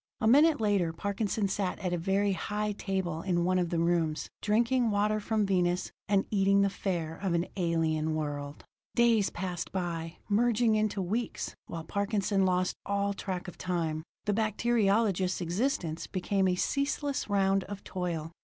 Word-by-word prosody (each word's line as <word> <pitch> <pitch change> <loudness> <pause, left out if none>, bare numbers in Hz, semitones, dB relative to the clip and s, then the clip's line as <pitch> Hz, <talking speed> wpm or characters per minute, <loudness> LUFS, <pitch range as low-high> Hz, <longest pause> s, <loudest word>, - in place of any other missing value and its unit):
A - - -1
minute 295 +5 +6
later 200 -6 +2
Parkinson 200 +3 -1
sat 195 -1 -1
at 185 -3 -2
a - - +1
very 195 +3 +1
high 210 +2 -2
table 190 -5 -2
in 175 -2 0
one 185 0 +2
of 175 -2 0
the 170 - -1
rooms, 165 -2 0
drinking 235 +3 +2
water 210 +1 +1
from 215 0 0
Venus, 180 -2 +1 0.2
and 200 -1 +3
eating 200 -1 +4
the 200 0 +2
fare 170 -5 -2
of 185 -3 -1
an 170 +1 +1
alien 160 -3 0
world. 145 -2 -4 0.3
Days 230 -4 +4
passed 180 -1 -4
by, 170 -3 -3
merging 230 +1 +3
into 215 -2 +1
weeks, 220 +6 -3
while 165 -1 -5
Parkinson 200 +1 0
lost 185 0 +1
all 200 0 0
track 190 -2 -4
of 180 - -9
time. 165 -4 -1 0.2
The 205 - +1
bacteriologist's 210 -3 +1
existence 175 - -1
became 190 +1 0
a 180 - +2
ceaseless 280 +4 -1
round 195 -1 +2
of 200 -1 -7
toil. 170 -3 -3
195 Hz, 160 wpm, -30 LUFS, 175-210 Hz, 0.3 s, minute